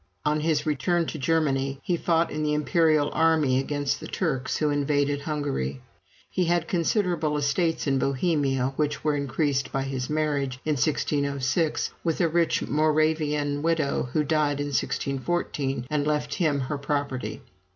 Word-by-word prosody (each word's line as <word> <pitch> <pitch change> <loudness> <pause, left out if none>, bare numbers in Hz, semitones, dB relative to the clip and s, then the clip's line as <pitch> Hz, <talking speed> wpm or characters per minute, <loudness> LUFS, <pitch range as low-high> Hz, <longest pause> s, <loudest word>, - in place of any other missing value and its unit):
On 150 +1 +2
his 155 -1 0
return 165 +4 +1
to 155 - -5
Germany, 135 -3 +1
he 180 - +1
fought 165 0 +1
in 155 - -3
the 150 0 +1
imperial 155 -1 +2
army 155 -5 +3
against 145 0 -1
the - - -7
Turks, 135 -8 -1
who 150 -1 +1
invaded 145 0 +1
Hungary. 140 - -2 0.5
He 180 - 0
had 170 -1 +1
considerable 170 -4 +1
estates 160 +4 0
in 135 -2 +1
Bohemia, 135 -2 +1
which 145 -1 -1
were 150 -1 +2
increased 140 -1 -1
by 135 - -1
his 135 -2 -3
marriage, 145 -4 -1
in 155 - +1
1606, 140 +1 0
with 165 -2 0
a 175 - +4
rich 165 +1 +1
Moravian 150 -1 +1
widow, 155 -5 0
who 155 - +2
died 150 -1 +1
in 145 0 -2
1614, 140 0 -1
and 150 +1 -1
left 150 -1 0
him 150 -5 +1
her 140 +2 -3
property. 140 -6 -3
150 Hz, 150 wpm, -26 LUFS, 140-160 Hz, 0.5 s, a